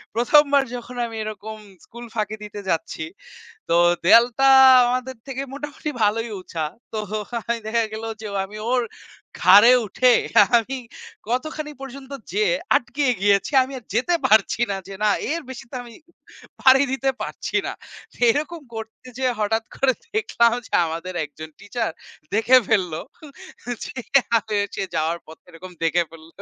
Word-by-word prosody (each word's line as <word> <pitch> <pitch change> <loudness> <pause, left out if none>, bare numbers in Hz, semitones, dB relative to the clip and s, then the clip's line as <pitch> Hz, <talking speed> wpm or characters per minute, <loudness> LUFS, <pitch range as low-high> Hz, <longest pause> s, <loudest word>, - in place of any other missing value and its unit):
১ম 295 +6 +5
বার 280 -1 +5
যখন 245 +1 -8
আমি 225 - -9
এরকম 215 0 -7 0.3
স্কুল 235 +1 -11
ফাঁকি 215 0 -2
দিতে 205 0 -8
যাচ্ছি। 160 -1 -2 0.6
তো 170 - +3 0.3
দেয়ালটা 240 +7 +5 0.4
আমাদের 255 +1 -2
থেকে 270 0 -4
মোটামুটি 295 +1 -5
ভালোই 225 +2 +1
উচা। 160 -3 -4 0.3
তো 220 - -3 0.4
আমি 235 0 -1
দেখা 230 +1 +1
গেল 220 +1 -6 0.2
যে 215 - -7
ও - - -1
আমি 210 +2 -10
ওর 250 -1 +2 0.6
ঘাড়ে 205 +7 +8
উঠে 250 +5 +3 0.4
আমি 260 +4 -1 0.5
কতখানি 300 +4 -3
পর্যন্ত 270 0 -9 0.2
যেয়ে 425 +3 +2 0.2
আটকিয়ে 270 +1 0
গিয়েছি, 200 +5 +2
আমি 265 +2 -6
আর 230 - -17
যেতে 260 +9 +1
পারছি 220 0 +3
না। 195 - -1
যে 195 - -7
না, 210 - +4 0.2
এর 335 +1 -1
বেশি 250 - -8
তো - - -8
আমি 235 -1 -13 0.7
পাড়ি 265 +1 +6
দিতে 270 0 0
পারছি - - -4
না। - - -3 0.6
এরকম 310 +5 -2
করতে 225 +3 -9
যেয়ে 255 -1 +1
হঠাৎ 220 +2 0
করে 265 -1 +3 0.2
দেখলাম 235 - +2
যে - - -20
আমাদের 165 +3 -5
একজন 155 +2 -10
টিচার 225 +1 -3 0.4
দেখে 230 +4 +5
ফেলল। 190 -7 +1 0.9
যে - - -8 0.4
আ - - +6
হচ্ছে 205 -1 -1
যাওয়ার 165 +2 0
পথে 160 - -15
এরকম 180 +2 -11
দেখে 170 +1 +2
ফেলল। 160 -1 -14
230 Hz, 150 wpm, -22 LUFS, 205-260 Hz, 0.9 s, ঘাড়ে